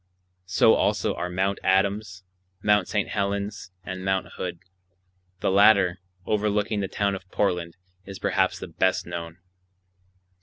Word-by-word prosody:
So 95 - +5
also - - +1
are 90 - -4
Mt. 95 +2 -1
Adams, 95 0 +1 0.4
Mt. 105 -3 +3
St. 105 -1 -1
Helens, 100 0 -2
and 95 0 -6
Mt. 95 0 -1
Hood. 90 -2 -4 0.8
The - - +1
latter, 100 -2 +5 0.3
overlooking 105 0 0
the 100 - -1
town 100 +1 0
of 95 -1 -8
Portland, 90 -4 -1 0.3
is 95 0 -9
perhaps - - +1
the - - -7
best 95 0 0
known. 85 -1 -6
95 Hz, 130 wpm, -25 LUFS, 90-100 Hz, 0.8 s, So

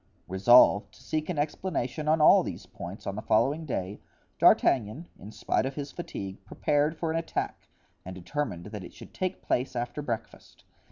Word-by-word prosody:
Resolved 100 +3 +5
to - - -18
seek 155 +1 -2
an 175 - -2
explanation 150 -2 -2
on 155 0 +3
all - - +7
these - - -6
points 90 +4 -9
on 100 - -3
the 105 - -4
following 140 +10 +1
day, 100 -5 -3 0.4
D'Artagnan, 130 +7 +3
in 105 - -10
spite 130 - 0
of 135 - -6
his 145 -1 -5
fatigue, 100 - -7
prepared 150 +8 0
for 165 -1 -2
an 165 - 0
attack 165 - -4 0.4
and 95 0 -8
determined 95 - -4
that 105 -3 -6
it - - -11
should - - -13
take 185 0 -3
place 125 +1 -1
after 120 +4 -3
breakfast. 120 -6 -6
130 Hz, 175 wpm, -28 LUFS, 100-155 Hz, 0.4 s, all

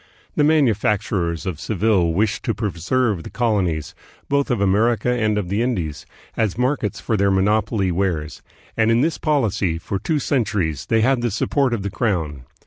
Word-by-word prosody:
The 150 - +3
manufacturers 105 - +1
of 90 -6 -4
Seville 100 -4 +1
wished 100 +5 0
to 115 - 0
preserve 105 +1 -1
the - - -9
col 115 -4 +1
onies, 80 -5 -3 0.4
both 140 0 +1
of 120 -4 +1
America 110 +5 +2
and 110 -3 +1
of 100 -4 -2
the 100 +5 -1
Indies, 90 - -2 0.3
as 110 -4 0
markets 125 -4 -1
for 115 - -1
their 100 -1 +2
monopoly 100 0 +1
wares; 85 -5 -2 0.3
and 110 0 +2
in 115 +1 +3
this 160 +3 0
policy, 110 - 0
for 95 +4 -4
two 160 - -1
centuries, 105 - -1
they 115 -1 +2
had 130 +1 +2
the 120 - 0
support 130 +5 0
of 115 -5 -2
the 100 - -3
crown. 80 - -2
105 Hz, 175 wpm, -21 LUFS, 95-120 Hz, 0.4 s, The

